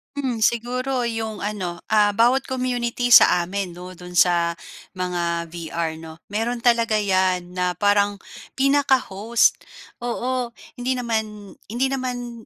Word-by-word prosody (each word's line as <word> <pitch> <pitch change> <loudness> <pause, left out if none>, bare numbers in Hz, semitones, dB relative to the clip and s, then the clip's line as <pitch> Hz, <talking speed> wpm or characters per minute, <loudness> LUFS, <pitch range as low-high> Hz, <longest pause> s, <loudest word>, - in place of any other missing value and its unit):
Hmm, 250 -6 0
siguro 250 +2 -1
'yong 225 -2 -4
ano, 190 -4 -4
ah, 210 -1 +4
bawat 240 +5 +3
community 245 -2 -2
sa 180 -6 +7
amin, 185 +1 -4
'no, 180 +1 -10
do'n 180 0 -10
sa 170 -1 +3 0.4
mga 170 -2 -2
VR, 165 -1 -4
'no, 160 0 -11
meron 230 +3 -2
talaga 230 -3 +3
'yan 185 -2 +1
na 180 0 0
parang 205 +2 +1 0.3
pinaka-host, 260 -6 +2 0.5
oo, 245 0 -2 0.2
hindi 250 +1 -1
naman 220 -5 -4
hindi 245 +5 -1
naman 245 -3 -4
215 Hz, 125 wpm, -22 LUFS, 180-245 Hz, 0.5 s, sa